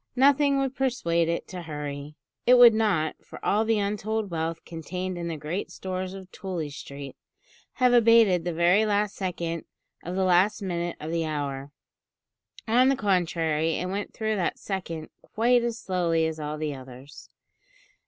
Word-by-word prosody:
Nothing 280 +2 +4
would 270 -1 -1
persuade 170 -12 +1
it 170 - -2
to 180 -1 -6
hurry. 150 -2 -6 0.3
It 250 - +8
would 240 -2 +9
not, 200 -9 0
for - - -11
all 210 +2 +3
the 225 0 +2
untold 210 0 -2
wealth 165 0 -3
contained 180 +3 -5
in 170 -1 -4
the 165 -2 -3
great 155 +6 -4
stores 185 0 -5
of 190 -1 -11
Tooley 175 -6 -5
Street, 140 -1 -8 0.6
have 250 -2 +3
abated 230 -7 +5
the 175 - -2
very 175 +5 +4
last 210 -1 0
second 170 -3 -3 0.4
of 175 +2 -5
the 190 - +1
last 185 +3 +3
minute 175 -3 -3
of 155 +2 -5
the 165 -1 0
hour. 140 -2 -4 1.0
On 250 +4 +5
the 275 - +3
contrary, 165 -6 +1
it 180 - -3
went 200 +2 -3
through 220 -1 -2
that 180 - -1
second 170 -5 -5
quite 240 +2 +2
as 235 -1 -2
slowly 170 -5 0
as 160 0 -3
all 150 0 -4
the 155 -1 -2
others. 130 +1 -12
180 Hz, 165 wpm, -26 LUFS, 160-215 Hz, 1.0 s, would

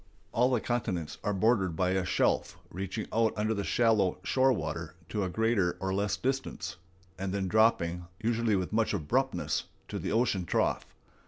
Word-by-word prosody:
All 125 +3 +3
the 125 - +3
continents 90 -11 -2
are 105 - 0
bordered 95 -3 +2
by 90 +2 +1
a 95 0 +1
shelf 90 - +1
reaching 95 +4 -4
out 115 -1 +3
under 110 +1 +1
the 100 -2 -2
shallow 110 -6 +2
shore 130 +4 +3
water 120 - -3
to 105 - -1
a 95 - -1
greater 105 -3 +1
or 95 0 -1
less 100 0 0
distance, 135 +7 -3 0.4
and 95 0 -2
then 95 -1 -1
dropping, 90 -5 +2
usually 115 -1 +1
with 95 +1 -2
much 115 0 +2
abruptness, 75 -2 0 0.2
to - - -3
the - - -3
ocean 110 -5 +1
trough. - - +1
105 Hz, 170 wpm, -30 LUFS, 95-115 Hz, 0.4 s, All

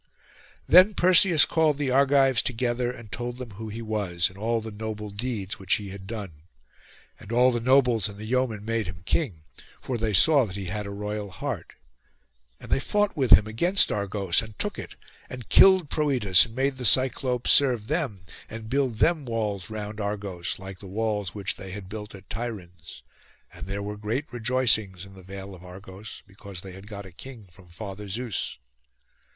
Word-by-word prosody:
Then 185 +4 +7
Perseus 180 -2 +6
called 155 -3 +1
the 140 -3 -1
Argives 135 -2 +4
together, 120 0 -1
and 115 -4 -12
told 120 0 -4
them 125 -3 -8
who 110 +2 -8
he 115 +2 -6
was, 100 -6 -1
and 95 - -17
all 115 +2 0
the 110 0 -7
noble 105 0 -6
deeds 105 -2 -4
which 95 -1 +2
he 100 -2 -6
had 95 0 -10
done. 105 -5 -6 0.9
And 105 - -12
all 125 +2 +4
the 120 - -1
nobles 120 -4 +3
and 100 - -11
the 105 - -8
yeomen 115 -3 -1
made 115 -2 -1
him 90 -1 -9
king, 95 - -1 0.4
for 125 -3 -4
they 110 -1 0
saw 140 - +6
that 95 - -8
he 100 -1 -5
had 100 +3 -4
a - - -6
royal 105 0 -5
heart; 90 - -6 0.9
and - - -12
they - - +3
fought 205 +7 0
with 135 -6 +5
him 105 - +7
against 170 - +2
Argos, 100 -3 0
and 110 -3 -11
took - - -1
it, - - -8 0.3
and 125 -3 -9
killed 190 -5 +6
Proetus, 120 - +3
and 115 - -14
made 135 0 0
the - - -5
Cyclopes 125 +1 +3
serve 125 -6 +5
them, 125 - -3 0.2
and 110 0 -8
build 130 -4 0
them 160 +4 +2
walls 110 -6 -3
round 105 0 -6
Argos, 100 -4 -3
like 95 -1 -10
the 100 - -11
walls 105 -1 -2
which 100 -2 -3
they 95 - -9
had 100 -2 -8
built 105 0 -8
at 95 - -14
Tiryns; 90 -8 -7 0.5
and - - -9
there 100 +1 -4
were 105 +1 -5
great 110 +7 -3
rejoicings 115 -6 +1
in 95 - -15
the 95 - -13
vale 95 +1 -9
of 90 -1 -13
Argos, 95 +3 -10
because 100 -2 -10
they 95 - -10
had 95 +2 -12
got 100 -2 -8
a 95 - -12
king 115 +4 -11
from 90 +1 -19
Father 100 +3 -8
Zeus. 115 - -3
110 Hz, 190 wpm, -26 LUFS, 100-125 Hz, 0.9 s, Then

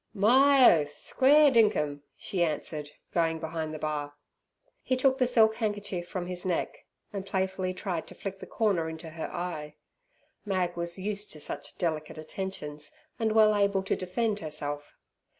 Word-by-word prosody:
"My 255 - +6
oath! 145 0 -8
Square 290 +2 +5
dinkum!" 205 - +2 0.2
she 185 - -2
answered, 150 -2 -3 0.2
going 165 -1 +1
behind 160 -1 -4
the 155 - -5
bar. 150 -1 -3 0.7
He 255 - 0
took 265 +1 +3
the 255 - +4
silk 220 -3 +4
handkerchief 205 -5 -2
from 180 -1 -4
his 180 0 -4
neck, 180 -3 -1 0.4
and 200 -1 -3
playfully 190 -1 -1
tried 180 -4 -3
to - - -11
flick 195 -1 -6
the - - -9
corner 190 -8 +1
into 160 0 -8
her 160 0 -5
eye. 155 -4 -5 0.7
Mag 185 -4 -1
was 170 +1 -1
used 205 +2 -2
to 155 - -7
such - - -5
delicate 155 -3 -2
attentions 155 -3 -5 0.3
and 220 -1 +1
well 215 -1 +6
able 200 -1 +2
to 195 - 0
defend 205 +4 -1
herself. 145 -3 -4
185 Hz, 160 wpm, -29 LUFS, 160-210 Hz, 0.7 s, My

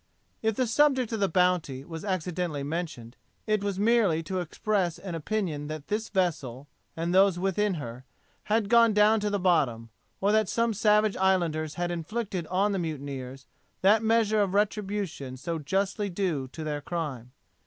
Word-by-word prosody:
If 220 -1 +1
the 255 - +1
subject 260 0 +2
of 225 - -2
the 195 -1 +2
Bounty 170 -7 +1
was 165 0 -7
accidentally 180 -5 -2
mentioned, 145 -7 -5 0.3
it 215 -2 +1
was 200 -2 -2
merely 205 -6 +3
to 185 +3 -3
express 180 0 -1
an 190 -3 -7
opinion 165 -3 -2
that 155 +1 -7
this 215 +2 -2
vessel, 150 - -1 0.3
and 170 +2 -1
those 190 -1 +5
within 195 +2 0
her, 125 -4 -7 0.4
had 215 -1 +1
gone 230 0 +5
down 210 +1 +5
to 210 0 -1
the 205 - 0
bottom, 130 - +1 0.3
or 200 +1 +2
that 215 -2 +2
some 230 -1 +1
savage 210 0 +3
islanders 170 -5 +1
had 175 0 -2
inflicted 180 0 -3
on 195 +4 +1
the 195 - -1
mutineers 135 -5 -5 0.4
that 210 +3 +5
measure 220 -1 +3
of 195 -1 0
retribution 200 -10 -1
so 165 +5 -3
justly 195 +6 -1
due 175 -8 -1
to 155 +5 -8
their 150 -1 -3
crime. 140 -7 -5
185 Hz, 165 wpm, -27 LUFS, 155-210 Hz, 0.4 s, those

